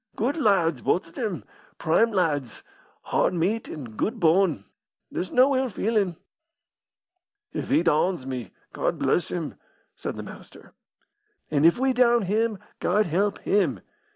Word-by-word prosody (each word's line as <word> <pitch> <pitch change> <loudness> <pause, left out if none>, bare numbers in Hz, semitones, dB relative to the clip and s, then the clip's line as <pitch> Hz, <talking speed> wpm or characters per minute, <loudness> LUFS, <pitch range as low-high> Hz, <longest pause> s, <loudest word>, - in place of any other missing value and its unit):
"Good 250 +6 0
lads, 175 - +2
both 180 - +1
of 165 - -18
them! 195 - -3 0.3
prime 225 +9 +2
lads! 145 - -1 0.4
hard - - +1
meat 195 +7 -1
an' 150 - -6
good 225 - -2
bone. 165 - +3 0.5
There's 180 - -4
no 265 +2 +4
ill 260 0 +1
feelin'." 205 -4 0 1.4
"If - - -4
he 295 +4 +3
downs 155 -2 +1
me, 125 -6 -5 0.2
Gawd - - -1
bless 175 - +1
him!" 165 -4 -5 0.4
said - - -5
the - - -6
Master, - - -13 0.8
"An' 145 0 +3
if 170 - +6
we 265 +1 +2
down 240 -2 +4
him, 215 +3 0 0.2
Gawd 210 +4 +2
help 195 +5 0
him!" 185 -10 +1
190 Hz, 145 wpm, -25 LUFS, 160-225 Hz, 1.4 s, if